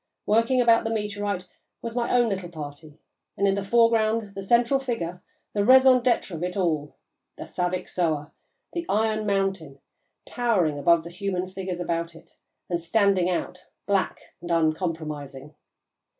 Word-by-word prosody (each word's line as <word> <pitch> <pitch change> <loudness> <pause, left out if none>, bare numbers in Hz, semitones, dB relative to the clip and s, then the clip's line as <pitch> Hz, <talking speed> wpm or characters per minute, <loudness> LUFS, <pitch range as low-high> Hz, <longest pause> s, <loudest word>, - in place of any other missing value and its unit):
Working 230 +4 +3
about 230 -2 +5
the 225 - -2
meteorite 205 -3 -2 0.4
was 230 0 -5
my 240 -1 0
own 245 -1 +4
little 190 -3 -3
party, 150 -1 -9 0.4
and, 200 - +2
in 195 - +3
the 200 - -1
foreground, 225 0 +2
the 195 - -6
central 235 +6 +3
figure, 205 -10 -4 0.3
the 205 - +1
raison 260 +2 +7
d'être 240 -5 +1
of 165 -2 -6
it 180 +2 -3
all, 155 -6 -1 0.4
the - - -6
'Saviksoah,' 175 -4 -2 0.4
the 340 - -2
'Iron 215 0 +1
Mountain,' 195 -8 -1 0.5
towering 190 -12 0
above 170 +2 +4
the 170 - -9
human 185 0 -3
figures 185 -1 -5
about 170 -1 -2
it - - -17 0.3
and 170 -1 -2
standing 195 0 +2
out, 180 0 -4 0.2
black 200 -2 0 0.2
and 175 - -8
uncompromising. 155 -4 -2
190 Hz, 150 wpm, -25 LUFS, 170-220 Hz, 0.5 s, raison